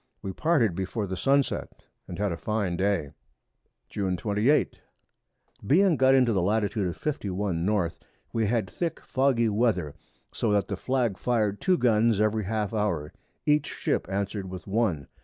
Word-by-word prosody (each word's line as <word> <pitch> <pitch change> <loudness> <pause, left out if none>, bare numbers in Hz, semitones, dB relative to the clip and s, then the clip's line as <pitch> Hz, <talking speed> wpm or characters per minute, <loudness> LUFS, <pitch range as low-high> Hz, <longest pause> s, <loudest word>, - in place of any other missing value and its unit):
We 95 - -4
parted 145 - +2
before 95 +4 -3
the 95 -1 -4
Sun 140 +7 +3
set, - - -5 0.3
and 90 - -7
had 105 -1 0
a - - -2
fine 100 -1 -2
Day. 95 -6 0 0.8
June 95 -3 -2
28. 110 - +1 0.9
Being 180 - +4
got 130 0 +4
into 125 -3 +4
the 95 - +1
Latitude 105 +1 0
of 85 - -5
51 100 - -2
N. 95 -6 +1 0.4
we 115 -2 +1
had 110 -2 0
thick 170 -2 -3
foggy 130 -3 +1
Weather, 105 -8 +1 0.4
so 110 - -1
that 100 -1 +1
the 100 - -1
Flag 120 -1 -1
fired 110 -4 0
two 185 -1 +3
Guns 115 -4 +3
every 110 -1 +1
half 105 0 -2
hour; 95 -9 -1 0.3
each 150 -1 +3
Ship - - -2
answer'd 100 0 -3
with 90 0 -8
one. 100 - 0
105 Hz, 160 wpm, -27 LUFS, 95-120 Hz, 0.9 s, Being